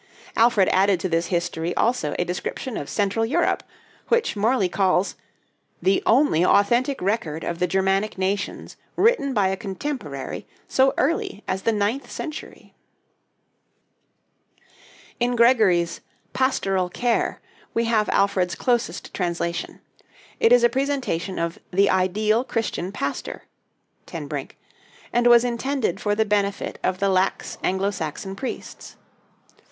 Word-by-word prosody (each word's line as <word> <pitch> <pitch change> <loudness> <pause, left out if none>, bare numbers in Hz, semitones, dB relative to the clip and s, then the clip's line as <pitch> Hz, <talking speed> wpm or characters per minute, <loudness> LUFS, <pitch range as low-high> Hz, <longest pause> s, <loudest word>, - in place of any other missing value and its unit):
Alfred 225 -4 +4
added 190 -1 +3
to - - 0
this 165 -1 0
'History' 175 -1 -2
also 230 -11 +1
a 175 - 0
description 180 +7 -4
of 140 - -5
Central 205 +2 0
Europe, 315 +10 +1 0.5
which 475 - +1
Morley 215 0 +2
calls 185 0 +1 0.7
"the 190 +1 +2
only 230 - +4
authentic 240 +9 +3
record 180 -6 -1
of 170 0 -3
the 180 - +2
Germanic 195 +2 0
nations 190 +2 -3 0.2
written 430 - +3
by 205 -6 +2
a 190 - 0
contemporary 195 - -5 0.2
so 265 0 +3
early 275 -7 -1
as 190 - -1
the 230 - +2
ninth 215 +5 -1
century." 310 -2 -8 2.5
In 245 0 +1
Gregory's 215 -8 +3 0.3
'Pastoral 195 -8 +1
Care' 240 +5 0 0.4
we 230 0 +2
have 220 -2 +1
Alfred's 185 -3 +1
closest 240 -8 -1
translation. 170 -1 -3 0.6
It 225 - +4
is 245 -1 +6
a - - +8
presentation 260 -9 -2
of 170 0 -2
"the 195 +2 +3
ideal 210 +5 +2
Christian 225 -7 -3
pastor" - - -4 0.6
(Ten - - -6
Brink), - - -6 0.6
and 240 0 +3
was 240 0 +7
intended 245 +2 -1
for 205 -1 0
the 220 +1 +2
benefit 200 -1 -1
of 185 - 0
the 195 +1 +1
lax 190 0 0
Anglo 190 +2 +1
Saxon 185 +2 -5
priests. 260 +5 -7
200 Hz, 130 wpm, -23 LUFS, 185-240 Hz, 2.5 s, a